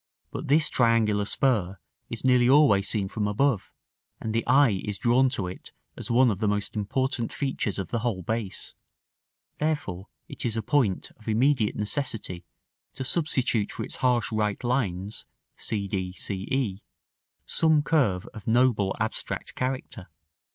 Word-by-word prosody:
But - - -5
this 155 +3 +4
triangular 110 -4 +2
spur 100 -6 +1 0.3
is 115 +2 -5
nearly 125 -1 +5
always 130 -9 +5
seen 100 -4 0
from 105 +1 -2
above, 110 +1 +1 0.5
and 110 - -3
the 115 - +1
eye 125 -6 +4
is 105 -2 -3
drawn 125 +5 +3
to 120 -7 -1
it 90 +1 -8 0.2
as - - -6
one 120 0 +5
of 95 - -3
the 110 - +1
most 105 0 -1
important 120 +3 -1
features 130 -7 -2
of 95 - -4
the 115 - -1
whole 110 -6 -2
base; 110 0 -4 0.9
therefore 145 - -2 0.2
it - - -7
is 115 -1 -1
a 110 - -1
point 115 -6 +1
of 110 - -20
immediate 115 0 +2
necessity 105 -5 -2 0.5
to - - -4
substitute 130 -7 +1
for - - -5
its - - -3
harsh 125 -2 +1
right 105 -1 -1
lines 105 -6 -2 0.3
(c 100 -2 -3
d, 95 -2 -3
c 95 0 -5
e) 110 -8 -1 0.6
some 160 -2 +3
curve 120 - +2
of 110 -3 -11
noble 115 -4 +3
abstract 110 0 -3
character. 125 -6 -4
110 Hz, 155 wpm, -26 LUFS, 100-130 Hz, 0.9 s, nearly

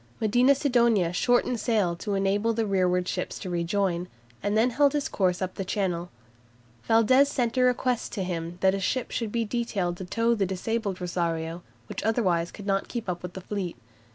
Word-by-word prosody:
Medina 245 +6 +4
Sidonia 235 - +2
shortened 245 +4 +2
sail 210 -7 +1
to 205 +3 -3
enable 200 +4 +1
the 225 0 0
rearward 180 -2 +1
ships - - -3
to 185 - -6
rejoin, 175 +1 0 0.3
and 205 +1 0
then 235 +3 +3
held 285 +3 +3
his 290 -1 0
course 185 -1 0
up 185 - -4
Channel. 180 -4 -1 0.8
Valdes 230 +5 +5
sent 240 -4 -1
a 255 - +2
request 250 -1 +1
to 195 - -2
him 170 -1 -4
that 190 0 +4
a 195 - -1
ship 240 +6 -1
should 225 -3 -2
be 230 0 0
detailed 205 -6 -2
to 185 - -6
tow 230 +5 +1
the 200 -4 0
disabled 200 +1 -2
"Rosario," 170 -2 -2 0.2
which - - -5
otherwise 185 -7 +1
could 205 - -10
not 195 -1 0
keep 235 -4 -5
up 175 -1 -3
with 180 0 -7
the 190 - -7
fleet. 190 -2 -4
200 Hz, 185 wpm, -27 LUFS, 180-230 Hz, 0.8 s, Valdes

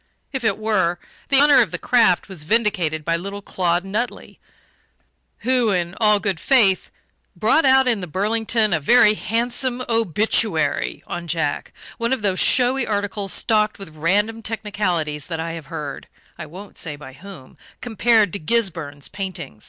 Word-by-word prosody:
If 265 -2 -3
it 220 -3 +1
were, 210 -5 0 0.3
the 275 - +4
honour 290 -2 +6
of 220 - +1
the - - -4
craft 230 -8 +2
was 185 -6 -8
vindicated 170 -6 0
by 165 - +1
little 200 +4 -6
Claude 175 -1 -1
Nutley, 215 +5 -4 1.0
who, 250 -2 +2
in 175 -3 -1
all 210 -1 +4
good 195 -4 -2
faith, 215 -9 +3 0.5
brought 320 - +2
out 265 0 +5
in 235 -4 +1
the 180 - -5
Burlington 215 +3 0
a 160 - +2
very 210 +6 +5
handsome 240 +4 -2
"obituary" 210 -7 0
on 175 0 -6
Jack 160 -3 -2 0.3
one 235 +2 0
of 260 - -3
those 190 -2 0
showy 250 0 +3
articles 205 -1 -2
stocked 215 -1 +1
with 180 -6 -11
random 205 +8 0
technicalities 185 -9 -2
that 165 -2 -4
I 165 +1 -3
have 165 -3 -8
heard 145 -2 -7 0.3
(I - - -8
won't 190 +6 -11
say 150 -3 -5
by 145 -2 -12
whom) 175 -4 -13 0.2
compared 225 -4 +2
to 200 - -3
Gisburn's 165 -8 -2
painting. 190 - -7
200 Hz, 160 wpm, -21 LUFS, 170-225 Hz, 1.0 s, honour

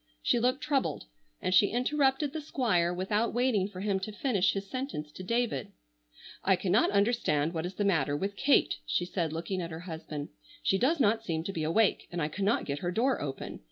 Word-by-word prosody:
She 240 - +3
looked 250 +3 +1
troubled, 280 -3 0 0.4
and 185 - +1
she 200 +2 +6
interrupted 270 +4 +1
the 315 - -3
Squire 215 - +1
without 205 +6 0
waiting 240 -6 +2
for 190 -2 -8
him 200 -1 0
to 190 +3 -5
finish 205 -4 +1
his 195 0 -4
sentence 255 - -4
to 185 - -10
David. 230 - -1 0.7
"I 190 - +4
cannot 190 +4 +2
understand 200 -8 +1
what 165 +1 -2
is 185 - -9
the 205 - 0
matter 145 -7 +2
with 200 +5 -3
Kate," 280 +5 +3
she 175 - 0
said, 175 -3 -2
looking 175 +4 -3
at 170 - -4
her 160 0 -7
husband. 160 -4 -6 0.3
"She 195 - +2
does 290 +7 +2
not 225 -2 +3
seem 160 -6 -2
to 195 - -4
be 165 - -3
awake, 200 +7 +2
and 175 - -3
I 150 -1 0
cannot 200 +7 0
get 140 0 -3
her 175 - -2
door 240 +8 +1
open. 135 -2 -5
195 Hz, 205 wpm, -30 LUFS, 170-240 Hz, 0.7 s, she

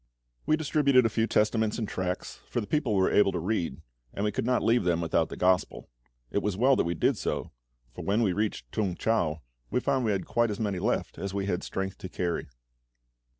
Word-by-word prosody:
We 155 - +4
distributed 145 -5 +3
a - - +3
few 115 0 +2
Testaments 110 0 +1
and 110 -3 -2
tracts, 90 -1 -4
for - - -1
the 110 - -3
people 130 -5 0
were 95 -1 +3
able 105 -1 +4
to 90 - -1
read, 85 -6 -2 0.3
and 100 - -1
we 105 - +1
could 115 - -2
not 125 -1 +2
leave 120 +1 +3
them 85 -1 +1
without 85 -1 +1
the - - -7
Gospel. 90 0 +1 0.4
It 100 - +1
was 100 -3 -1
well 130 +4 +5
that - - +1
we 85 +1 -1
did - - +2
so, - - -3 0.4
for - - -7
when 105 +4 +2
we 95 -4 +2
reached 100 - -2
T'ung 100 -5 -1
chau 85 -9 0 0.3
we - - +1
found 135 0 0
we 110 - +1
had 100 - -1
quite 120 -1 +1
as 105 - -4
many 100 -4 -1
left 110 +7 -1
as 100 0 -4
we 100 -1 -1
had 90 -3 -1
strength 95 -1 -4
to 95 - -7
carry. 85 -2 -2
105 Hz, 225 wpm, -28 LUFS, 90-115 Hz, 0.4 s, well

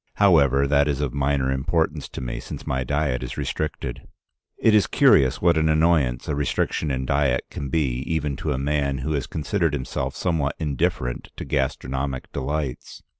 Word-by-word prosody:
However, 70 -9 +4
that 70 +1 +3
is 70 -2 0
of 75 -4 -2
minor 70 -1 +1
importance 80 +2 -1
to - - -7
me, - - -4
since - - -8
my 65 0 -1
diet 70 -1 0
is 65 +1 -6
restricted. 75 -5 -4 0.5
"It 110 - +3
is 105 -2 +5
curious 95 - +4
what 85 -2 +4
an 80 0 +2
annoyance 75 -6 +2
a - - -1
restriction 75 +1 -1
in 65 -1 -2
diet 70 -2 +1
can 70 - -5
be 65 -4 0
even 75 -3 -1
to 75 +2 -2
a 65 - 0
man 70 0 0
who 80 - -1
has 70 -4 -1
considered 85 0 -1
himself 65 -3 -3
somewhat 80 -6 0
indifferent 65 -4 -1
to - - -5
gastronomic 65 -1 -2
delights. 70 -1 -4
70 Hz, 175 wpm, -24 LUFS, 65-80 Hz, 0.5 s, is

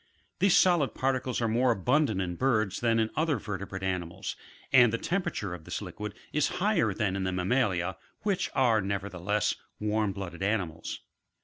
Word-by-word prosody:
These 195 -1 +5
solid 175 -7 +3
particles 130 -1 0
are 115 - +2
more 120 +3 +2
abundant 115 - +2
in 90 -1 -4
birds 110 -5 +1
than 115 -1 +2
in 110 0 +1
other 155 -2 +1
vertebrate 95 -2 -5
animals, 90 -1 -3 0.4
and 125 -3 +7
the 115 - 0
tem 185 +10 0
perature 105 - -3
of 85 -3 -8
this - - -4
liquid 105 -1 -6 0.2
is 150 -1 +3
higher 195 - +2
than 100 -1 -1
in 95 - -1
the 95 - 0
mammalia, 95 -1 0 0.3
which 195 -3 0
are 115 -5 +4
nevertheless, 100 +1 -1 0.3
warm 105 -1 +1
blooded 95 -2 -7
animals. 95 -5 -2
105 Hz, 170 wpm, -29 LUFS, 95-130 Hz, 0.4 s, and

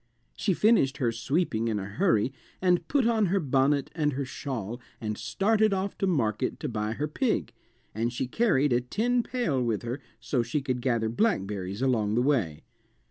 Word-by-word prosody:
She 195 -4 0
finished 160 - +3
her 125 -5 +1
sweeping 115 -1 0
in 110 -2 0
a 100 - -3
hurry 125 - +1 0.3
and 180 -1 +2
put 275 -4 +2
on 225 -3 +3
her 195 +3 +2
bonnet 140 -2 +1
and 150 -3 0
her 140 +1 -2
shawl 120 -3 -5 0.2
and 105 -1 -3
started 200 - +2
off 190 +1 -2
to 195 - +1
market 115 - 0
to 150 - -2
buy 110 -3 -2
her 145 +6 -2
pig, 185 - -1 0.4
and 115 +3 -1
she 125 - -2
carried 145 - +2
a 120 - +3
tin 240 - +1
pail 230 - -1
with 115 -2 -1
her 120 +4 -4 0.2
so 125 - 0
she 120 +6 -1
could 130 -3 -2
gather 120 -3 +1
blackberries 105 - -1
along 110 -5 +1
the 120 - +3
way. 105 - 0
130 Hz, 185 wpm, -28 LUFS, 115-180 Hz, 0.4 s, finished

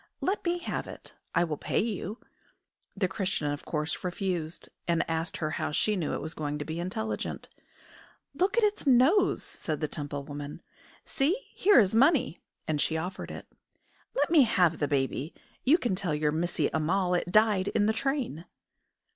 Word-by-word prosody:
Let 385 +3 -1
me 345 0 +1
have 350 - -4
it; - - -10 0.2
I - - +4
will 155 -3 -2
pay - - -2
you." 210 -1 -2 0.8
The 190 -2 +2
Christian 190 -6 -1
of 145 - -5
course 150 0 -2
refused, 180 -3 -3 0.2
and 170 -1 +1
asked 165 0 -2
her 155 -1 -2
how - - -2
she 210 +7 +1
knew 175 -5 -1
it - - -4
was 160 - -4
going 150 -1 -3
to 145 - -5
be 160 +1 -4
intelligent. 220 +5 -3 0.8
"Look 390 +5 +1
at 470 - +4
its 415 -7 +1
nose," 275 - +4
said 155 -2 -4
the 155 - -1
Temple 145 -1 -4
woman. 145 0 -7 0.4
"See, 340 - 0
here 410 +1 +5
is 200 -3 +3
money!" 260 - +3 0.3
and 150 -2 +1
she 160 - +1
offered 180 +4 -5
it. - - -8 0.7
"Let - - +1
me 325 -4 +7
have 180 -9 +3
the 145 - +1
baby! 140 +2 -1 0.3
You 290 +6 +5
can 240 - -1
tell 185 -5 0
your 150 0 +1
Missie 175 +3 0
Ammal 180 +4 +1
it 175 0 0
died 210 -2 +4
in 205 0 +2
the 220 - +3
train!" 245 - -2
180 Hz, 180 wpm, -29 LUFS, 155-235 Hz, 0.8 s, me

